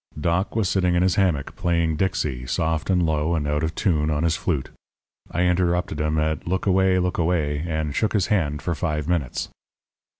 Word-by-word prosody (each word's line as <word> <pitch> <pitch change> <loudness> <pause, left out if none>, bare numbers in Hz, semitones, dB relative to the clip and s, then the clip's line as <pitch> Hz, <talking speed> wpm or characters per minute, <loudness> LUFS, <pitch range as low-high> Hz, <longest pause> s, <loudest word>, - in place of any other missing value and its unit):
"Doc 85 +7 0
was 110 -4 +1
sitting 90 -2 +1
in 90 - +3
his 95 -1 +3
hammock 85 -9 0
playing 85 -2 0
'Dixie,' 75 -8 -1
soft 80 +6 -1
and 90 -2 +3
low 80 +1 +1
and 75 -3 -1
out 75 0 0
of 80 0 -2
tune, 80 -5 +1
on 75 0 0
his 80 -1 +2
flute. 75 -7 -2 0.6
I 85 - 0
interrupted 90 -3 +1
him 75 0 0
at 80 +1 -1
'Look 95 +1 -1
away! 95 -1 +3
look 90 -1 0
away!' 80 -3 0
and 80 -3 -2
shook 110 +7 0
his 105 -4 +2
hand 75 -9 0
for 85 - -1
five 75 -1 -2
minutes. 85 -8 -1
85 Hz, 195 wpm, -23 LUFS, 75-90 Hz, 0.6 s, in